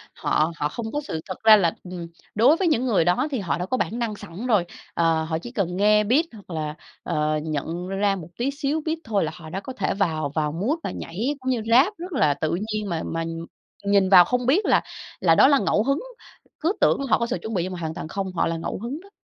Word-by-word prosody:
họ 155 +2 +1
họ 150 -2 -1
không 225 +5 -5
có 295 - -2
sự 160 - -5
thật 185 - -6
ra 220 -1 +9
là 170 -4 +2
ừm, 180 -2 -7 0.3
đối 255 +10 +5
với 380 - +1
những 260 -6 +2
người 210 -9 +2
đó 180 - +2
thì 265 - -1
họ 165 -8 -1
đã 180 - -3
có 255 - -1
bản 235 -1 -2
năng 225 -3 -2
sẵn 195 +3 -8
rồi, 210 -7 +3 0.3
ờ, 165 -1 +2
họ 160 0 -2
chỉ 240 +9 -8
cần 180 -6 -2
nghe 210 +1 +4
beat 260 +10 +3
hoặc 205 -4 -14
là, 155 -3 -3 0.3
ờ, 155 0 0
nhận 160 +3 -3
ra 195 +1 +1
một 170 -5 -8
tí 255 +4 0
xíu 290 +2 -1
beat 320 0 0
thôi 205 -3 0
là 155 - -2
họ 160 -2 -10
đã 190 - -4
có 260 +6 -7
thể - - -1
vào 160 -7 0
vào 150 -2 0
mood 215 - -1
và - - -3
nhảy 225 - -3
cũng 260 0 -3
như 245 -3 0
Rap 270 - +5
rất 355 +3 -7
là 155 - +3
tự 155 +3 -1 0.2
nhiên 210 -1 -2
mà 165 -2 -2
mà 165 0 -2 0.6
nhìn 200 -1 +3
vào 180 -2 +9
không 250 +5 -1
biết 320 - +3
là - - +4 0.4
là 165 -3 +4
đó - - +7
là 280 0 +5
ngẫu 210 - +2
hứng, 275 +4 +1 0.6
cứ 330 +5 +1
tưởng - - +4
họ - - +4
có 235 - +1
sự 255 - -1
chuẩn 220 - -5
bị 180 -4 0
nhưng 185 +1 -4
mà 180 - -6
hoàn 160 -1 -3
toàn 155 - -6
không, 190 +2 -4
họ 170 - +1
là 165 0 -2
ngẫu 165 - -4
hứng 245 +8 -5
đó. 395 - -17
200 Hz, 260 wpm, -24 LUFS, 165-250 Hz, 0.6 s, ra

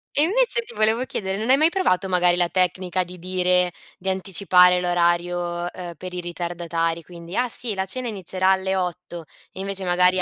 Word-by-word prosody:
E 285 - +3
invece 470 +8 +2
ti 470 +1 -12
volevo 220 +4 +2
chiedere, 190 -5 -3
non 225 +3 -3
hai 265 - +6
mai 310 +3 +4
provato 195 - +1
magari 180 -1 +3
la 175 -1 +3
tecnica 185 0 +1
di 180 +1 -11
dire 180 0 +1 0.3
di 190 - -3
anticipare 185 -1 +4
l'orario, 175 0 +1 0.3
uhm, 175 -1 -7
per 185 +1 -8
i 180 - -4
ritardatari? 170 -1 -3
Quindi: 170 +1 -10
"Ah, 250 0 +1
sì, 235 -1 -3
la 190 -1 -2
cena 245 +5 -4
inizierà 190 -2 0
alle 190 0 +1
8." 180 -2 -4 0.3
E - - -11
invece 195 -1 -4
magari 180 +1 +4
185 Hz, 190 wpm, -23 LUFS, 175-195 Hz, 0.3 s, hai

